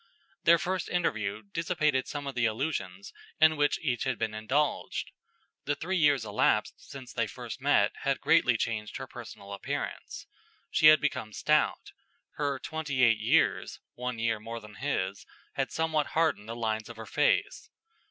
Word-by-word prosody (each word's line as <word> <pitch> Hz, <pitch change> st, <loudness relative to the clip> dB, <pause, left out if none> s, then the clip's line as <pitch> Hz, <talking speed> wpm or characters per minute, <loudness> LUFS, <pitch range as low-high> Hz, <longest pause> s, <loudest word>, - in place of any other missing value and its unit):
Their 170 Hz, 0 st, +7 dB
first 185 Hz, +2 st, -2 dB
interview 110 Hz, -, -1 dB
dissipated 150 Hz, -, 0 dB
some 145 Hz, -1 st, -5 dB
of 140 Hz, -, -4 dB
the 125 Hz, -2 st, +1 dB
illusions 110 Hz, -, -3 dB, 0.3 s
in 155 Hz, 0 st, +6 dB
which 145 Hz, -1 st, +2 dB
each 125 Hz, -5 st, 0 dB
had 130 Hz, -3 st, -1 dB
indulged. 110 Hz, +7 st, -1 dB, 0.5 s
The 145 Hz, -, 0 dB
three 180 Hz, +6 st, -3 dB
years 145 Hz, -8 st, +3 dB
elapsed 105 Hz, 0 st, +2 dB
since 130 Hz, -2 st, -10 dB
they 115 Hz, -2 st, 0 dB
first 120 Hz, +2 st, -8 dB
met 130 Hz, -7 st, +3 dB
had 140 Hz, 0 st, -1 dB
greatly 120 Hz, -2 st, +4 dB
changed 110 Hz, -2 st, -3 dB
her -, -, -6 dB
personal 100 Hz, 0 st, -10 dB
appearance. 100 Hz, -, -5 dB, 0.5 s
She 155 Hz, -, +5 dB
had 155 Hz, 0 st, +8 dB
become 120 Hz, -7 st, -2 dB
stout; 150 Hz, +6 st, +1 dB, 0.5 s
her 145 Hz, -2 st, 0 dB
twenty 145 Hz, -2 st, -2 dB
eight 115 Hz, -3 st, +5 dB
years -, -, +2 dB
(one 125 Hz, -1 st, -4 dB
year 115 Hz, -1 st, 0 dB
more 115 Hz, +2 st, -6 dB
than 105 Hz, -1 st, -13 dB
his) 100 Hz, -8 st, -3 dB, 0.3 s
had -, -, -2 dB
somewhat 160 Hz, -2 st, 0 dB
hardened 155 Hz, -10 st, +1 dB
the 115 Hz, -, -4 dB
lines 110 Hz, -1 st, -2 dB
of 115 Hz, -, -10 dB
her 110 Hz, -, -7 dB
face. 150 Hz, -, +1 dB
130 Hz, 160 wpm, -29 LUFS, 110-150 Hz, 0.5 s, had